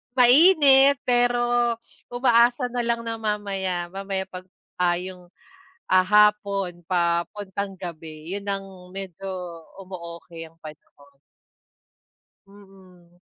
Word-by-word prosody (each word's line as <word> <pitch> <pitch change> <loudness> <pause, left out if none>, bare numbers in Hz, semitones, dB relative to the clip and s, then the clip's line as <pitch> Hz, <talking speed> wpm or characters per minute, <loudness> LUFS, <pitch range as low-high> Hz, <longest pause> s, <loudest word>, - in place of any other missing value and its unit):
Mainit, 275 +1 +6
pero 245 0 +2 0.7
umaasa 245 0 +2
na 245 - -3
lang 235 0 -1
na 230 0 -4
mamaya 195 -5 -3
mamaya 195 0 -3
pagka 185 0 -9 0.6
yong, 180 -1 -10 0.6
ah, 185 0 +4
hapon 200 -2 +2
papuntang 190 +3 -2
gabi, 160 -2 -8
yun 200 0 -6
ang 195 -2 -6
medyo 195 0 -8 0.5
umo-okey 170 -3 -9
ang 165 - -29
panahon. 145 -2 -15 1.3
Mm. 190 -3 -19
195 Hz, 95 wpm, -24 LUFS, 175-220 Hz, 1.3 s, Mainit